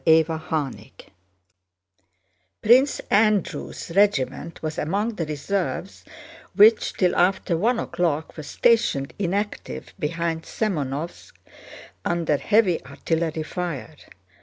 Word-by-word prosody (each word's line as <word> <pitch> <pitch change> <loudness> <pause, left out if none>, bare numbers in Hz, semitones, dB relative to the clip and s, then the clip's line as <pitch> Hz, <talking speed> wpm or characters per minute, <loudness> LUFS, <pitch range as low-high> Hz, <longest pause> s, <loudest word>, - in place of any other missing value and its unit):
CHAPTER 160 0 +4
XXXVI 155 -4 -4 1.7
Prince 255 +5 +5
Andrew's 210 -4 +1
regiment 170 -7 +1
was 155 -1 -3
among 200 +9 -1
the 165 -6 -4
reserves 180 +5 -3 0.5
which 215 +2 +5
till 180 -2 +1
after 180 -1 +2
one 230 +9 +1
o'clock 160 -8 -2
were 155 - -6
stationed 155 -4 +1
inactive 205 +2 -3
behind 165 0 -2
Semënovsk, 165 - -3 0.7
under 165 -4 +1
heavy 205 0 +2
artillery 160 -1 -2
fire. 160 - -5
170 Hz, 95 wpm, -24 LUFS, 155-205 Hz, 1.7 s, Prince